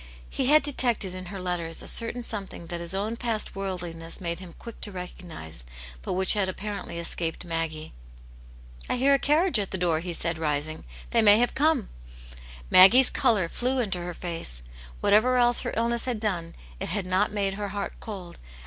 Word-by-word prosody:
He 260 - 0
had 305 +1 +6
detected 240 -9 +1
in 185 0 -7
her 195 +1 -6
letters 175 -3 -2
a - - -7
certain 235 +1 0
something 200 -6 -4
that 170 0 -5
his 170 +2 -4
own 215 +4 -2
past 230 -3 -2
worldliness 175 -4 -5
made 170 -2 -3
him 180 -3 -11
quick 230 -2 -11
to 205 - -2
recognize, 175 - -9 0.4
but - - -3
which 190 +1 +3
had 200 -3 +1
apparently 200 -2 -5
escaped 170 0 -3
Maggie. 165 -2 -3 1.0
'*I - - +2
hear 270 +3 +4
a 275 - +4
carriage 305 - +3
at 200 - -1
the 190 - -2
door," 170 -3 +1
he 175 +1 -5
said, 165 0 -2
rising. 150 0 -2
" - - -16
They 230 - +4
may 210 -1 +8
have 245 +1 +2
come." 295 -5 +2 0.8
Maggie's 240 +8 +8
colour 205 -7 +2
flew 250 +9 0
into 200 -8 0
her 175 0 -5
face; 165 - -4 0.4
whatever 245 +5 +4
else 240 -1 +4
her - - -3
illness 235 +1 0
had 245 -4 -2
done, 175 -6 -2 0.2
it - - -3
had 190 +2 0
not 185 +3 +1
made 200 -2 -1
her 205 +1 -4
heart 200 0 -4
cold, 190 -5 -8
and. - - -20
190 Hz, 195 wpm, -26 LUFS, 170-230 Hz, 1.0 s, may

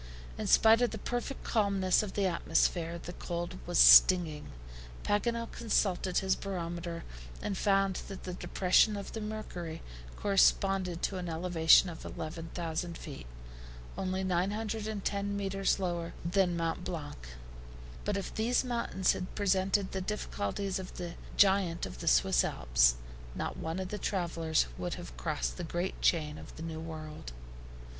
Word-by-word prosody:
In - - -4
spite 225 +1 +6
of 245 - +3
the 220 - -6
perfect 245 +5 -4
calmness 200 -4 +2
of 210 -3 -5
the 200 - 0
atmosphere, 170 -1 +1
the 175 +1 -8
cold 170 - -5
was - - -1
stinging. 150 - +7 0.6
Paganel 230 +3 0
consulted 195 -5 0
his 190 -1 +2
barometer, 170 -3 -5 0.4
and 200 - -3
found 195 -1 +2
that 195 - -8
the 180 - -5
depression 190 +4 +2
of 200 - -7
the 225 - -5
mercury 180 -6 -6 0.3
corresponded 195 -2 +2
to 195 - -1
an 180 -1 -4
elevation 165 +1 +5
of 170 -2 -8
11,000 165 +1 -5
feet, 140 - -9 0.7
only 190 0 -2
910 200 +1 -1
meters 195 0 0
lower 175 -3 -3
than 175 0 +2
Mont 165 +1 -2
Blanc. 145 - -6 0.8
But 205 - -1
if 195 - -5
these 235 +4 +1
mountains 235 -7 0
had 180 - -6
presented 195 0 +1
the 190 - -3
difficulties 195 - -3
of 185 - -8
the 175 -2 -5 0.2
giant 190 -4 +3
of - - -9
the - - -6
Swiss - - +4
Alps, - - +3 0.4
not - - -3
one 160 +2 -4
of 190 -1 -4
the 210 - -4
travelers 170 -5 0
could 175 - -3
have 175 - -9
crossed 155 -3 -2
the 175 - -4
great 175 +3 -3
chain 155 -3 +1
of - - -12
the 160 - -8
New 160 -1 -5
World. 155 - -8
180 Hz, 150 wpm, -31 LUFS, 165-200 Hz, 0.8 s, stinging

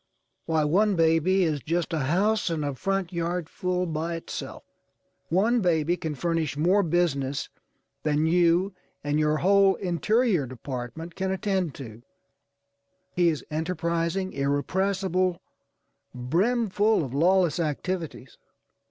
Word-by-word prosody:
Why, 160 -2 +2
one 195 +7 +2
baby 165 +3 +3
is 155 -4 0
just 170 +3 -2
a 160 - 0
house 190 +9 +1
and 160 -3 -2
a 145 - -2
front 195 +4 -2
yard 170 0 -2
full 180 +1 -2
by 165 +1 -3
itself. 165 - -7 0.7
One 220 +8 +2
baby 170 -2 +2
can 160 -4 -4
furnish 165 -2 -1
more 180 +7 +3
business 150 -6 0 0.5
than 150 0 +1
you 175 +3 +3 0.3
and 145 +1 0
your 155 0 +2
whole 195 +2 +4
Interior 190 - +1
Department 130 +6 -7
can 190 +1 -2
attend 190 -4 -1
to. 115 -4 -9 1.1
He 175 -1 +4
is 155 -3 -3
enterprising, 170 +3 -1
irrepressible, 185 +6 0 0.8
brimful 205 - +1
of 130 - -8
lawless 175 +2 +3
activities. 165 -3 -4
170 Hz, 120 wpm, -26 LUFS, 150-190 Hz, 1.1 s, whole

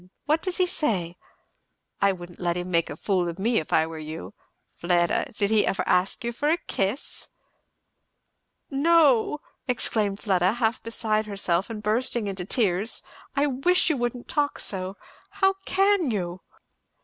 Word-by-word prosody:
What 310 +2 +1
does 370 -2 -2
he 370 - +4
say? 190 - -1 0.9
I 200 - +4
wouldn't 175 -2 -9
let 175 -1 -1
him 180 +1 -4
make 170 -1 +1
a - - -6
fool 185 -4 0
of 170 - -7
me 225 +4 +1
if 155 - -8
I 160 - +4
were 160 -1 -7
you. 155 - -7 0.4
Fleda! 175 0 0
did 200 0 +1
he 215 -1 +4
ever - - 0
ask 180 +5 +1
you 235 - -2
for 290 +5 -1
a 330 - +3
kiss?" 205 - -3 1.4
"No!" 295 -2 +3 0.3
exclaimed 215 -5 +1
Fleda 185 -2 +2
half 230 -1 0
beside 215 -1 0
herself 195 -2 0
and 215 -2 -6
bursting 230 +1 +1
into 190 -3 -4
tears; 205 0 +2 0.3
"I 280 +1 +2
wish 295 +6 +3
you 295 - -1
wouldn't 240 0 -3
talk 290 -1 0
so! 190 0 0 0.4
How 385 -1 +3
can 390 -5 +3
you?" 180 -4 -3
215 Hz, 160 wpm, -25 LUFS, 180-270 Hz, 1.4 s, he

